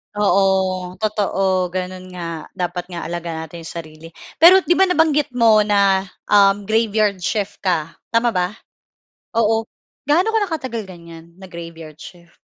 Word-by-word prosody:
Oo, 190 -2 +1
totoo, 195 -3 0
gano'n 185 +1 -5
nga, 165 -3 -6
dapat 180 0 -4
nga 175 -2 -6
alaga 165 -1 -5
natin 160 +2 -10
'yong 165 - -9
sarili. 155 -1 -9 0.3
Pero 365 +3 +8
'di - - -2
ba 385 - +5
nabanggit 300 -6 +1
mo 225 -3 +5
na, 200 -2 +2 0.2
um, 200 0 +5
graveyard 215 -2 +1
shift 205 +2 -3
ka, 165 -4 -1 0.2
tama 230 +1 +1
ba? 180 0 -1 0.8
Oo, 225 0 +2 0.4
gaano 340 +9 +3
ka 445 - +3
na 390 - -5
katagal 260 -8 -4
ganyan, 170 -2 -13
na 190 - -11
graveyard 165 -3 -10
shift? 170 -1 -14
190 Hz, 150 wpm, -19 LUFS, 170-220 Hz, 0.8 s, Pero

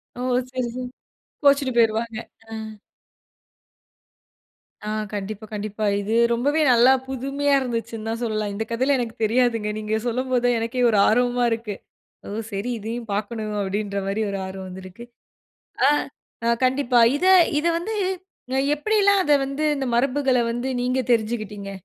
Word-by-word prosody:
ஓ! - - -9 0.3
சரி, 255 -1 -2
சரி. 255 0 -4 0.6
கோச்சுட்டு 280 -2 +4
போயிருவாங்க. 225 0 +2 0.3
ஆ. - - -8 2.3
ஆ - - -5 0.3
கண்டிப்பா, 205 +1 -5
கண்டிப்பா. 210 +1 -3 0.2
இது 215 +3 -1 0.2
ரொம்பவே 285 +7 +1
நல்லா 245 +2 +6 0.2
புதுமையா 275 +2 -1
இருந்துச்சுன்னு 230 -3 -4
தான் 225 +1 -3
சொல்லலாம். 215 -2 -1
இந்த 220 - -2
கதையிலாம் 260 +4 +2
எனக்கு 230 -2 -4
தெரியாதுங்க. 230 -1 +2
நீங்க 215 0 -2
சொல்லும்போது 250 +1 0
தான் 245 -1 +3
எனக்கே 230 +2 -2
ஒரு 215 - +2
ஆர்வமா 245 +2 +2
இருக்கு. 225 -2 -3 0.5
ஓ! - - -6 0.2
சரி 200 +5 -3
இதையும் 225 +2 -5
பார்க்கணும் 215 +1 -3
அப்டின்ற 200 +1 -2
மாரி 205 +3 -1
ஒரு 195 - -3
ஆர்வம் 190 0 -7
வந்துருக்கு. 185 +5 -10 0.8
ஆ - - +6 0.6
அ 235 - +3 0.2
கண்டிப்பா. 255 -2 +2 0.2
இத 365 - -1 0.3
இத 305 - -4
வந்து 395 +7 -4 0.6
அ - - +3 0.2
எப்டில்லாம் 400 +3 +3
அத 295 - +3
வந்து 275 +3 -3
இந்த 275 -1 -2
மரபுகள 265 +1 +2
வந்து 240 +2 -3
நீங்க 255 +1 0
தெரிஞ்சுக்கிட்டீங்க. 215 -3 -1
235 Hz, 140 wpm, -23 LUFS, 215-260 Hz, 2.3 s, நல்லா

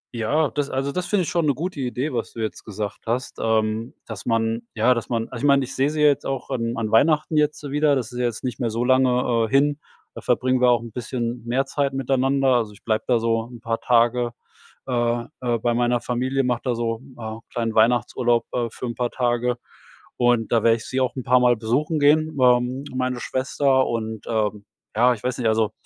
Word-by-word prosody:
Ja, 140 +7 +1
das 145 -1 -2
also, 135 +1 -2
das 180 +4 -3
finde 205 -3 +1
ich - - -3
schon 170 -3 +1
'ne 140 - +2
gute 170 +2 -4
Idee, 130 +2 -2
was 115 -2 -3
du - - -9
jetzt 110 -1 -4
gesagt 105 0 -6
hast. 125 +3 -2
Ähm, 110 +1 0
dass - - -8
man 115 0 0
ja, 115 +3 +4
dass 115 -2 -4
man 115 -2 0
also, 120 -3 -7
ich 145 - +2
meine, 140 -1 +4
ich 135 - -9
sehe 135 +2 +2
sie 155 0 -2
jetzt 145 -2 +4
auch 135 -2 -4
an 115 -1 -2
an 110 -2 -2
Weihnachten 155 +6 +3
jetzt 150 0 +1
wieder. 150 0 +3
Das 125 -3 -3
ist 125 - -6
ja 125 - +1
jetzt 120 -2 -3
nicht 125 0 -4
mehr 120 -3 0
so 115 +2 -1
lange, 125 -2 +3
äh, - - -12
hin. 145 +3 +2 0.3
Da - - -9
verbringen 130 0 +1
wir 125 - +5
auch 120 -2 +3
'n 115 - -9
bisschen 120 0 -4
mehr 130 +3 +1
Zeit 140 0 -1
miteinander. 135 +1 +1
Also, 110 -3 -2
ich 100 - -19
bleibe 110 -1 -1
da 125 - +3
so 115 0 0
'n 120 - -10
paar 115 0 -2
Tage, 120 0 +2 0.5
äh, 120 -2 0 0.2
äh, 120 -2 0
bei 120 +1 0
meiner 120 0 +1
Familie, 130 +3 -1
mache 125 -2 0
da 125 -3 0
so, 115 0 -2 0.2
äh, 110 -1 -6
kleinen 115 -2 -2
Weihnachtsurlaub, 120 +1 +2
äh, 120 -1 0
für 120 - -7
’n 120 - -3
paar 120 +1 -1
Tage. 120 -1 0 0.6
Und 120 -2 +2
da 115 -2 +3
werde 115 +1 +4
ich 115 - -10
sie 130 0 -1
auch 130 -1 0
'n 130 - -4
paar 125 +1 +4
Mal 125 -1 +4
besuchen 135 +8 0
gehen, 155 +1 +3
ähm, 125 +1 +3
meine 125 -1 -1
Schwester, 130 +1 +1
und, 110 -2 -4
ähm, 105 -2 -1 0.3
ja, 125 +3 +4
ich 105 - -15
weiß 125 0 -2
nicht 120 - +1
also, 110 -1 +2
125 Hz, 225 wpm, -23 LUFS, 115-135 Hz, 0.6 s, wir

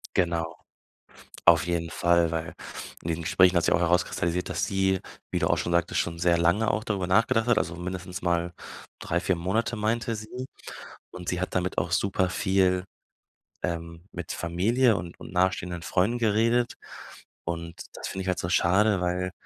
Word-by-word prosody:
Genau, 85 -2 0 0.9
auf 85 -1 +6
jeden 85 -1 -1
Fall, 85 -1 +2
weil 80 0 -3 0.5
in 85 - -5
diesen 85 0 -1
Gesprächen 90 +2 +4
hat 85 - +4
sich - - +3
auch - - +4
herauskristallisiert, 85 0 +1
dass - - -1
sie, 95 -1 +1 0.3
wie - - 0
du - - +1
auch - - +2
schon - - -2
sagtest, 85 0 +1
schon 85 0 -3
sehr 85 0 +3
lange 85 +7 +2
auch 110 - -1
darüber 100 -4 -2
nachgedacht 110 +4 +3
hat, 120 -3 +4
also, 85 +1 -2
mindestens 90 +1 -5
mal 85 0 0 0.5
3, 85 - -1
4 90 0 +1
Monate 110 +8 -1
meinte 115 +2 0
sie 125 +4 -7 0.6
und 90 -1 -9
sie 90 0 -1
hat 95 - -3
damit 90 0 -1
auch 85 +1 0
super 95 0 +1
viel, 95 -1 +2 0.8
ähm 85 -1 -4
mit 85 -1 -5
Familie 110 +8 +2
und 85 0 -7
und - - -10
nahestehenden 90 -1 0
Freunden 100 +8 +1
geredet 115 +2 +2 0.7
und 85 0 -5
das - - -6
finde 95 - -4
ich 95 - -7
halt 90 - 0
so 85 - -3
schade, 95 +3 +3
weil 90 +1 -1
90 Hz, 175 wpm, -27 LUFS, 85-100 Hz, 0.9 s, auf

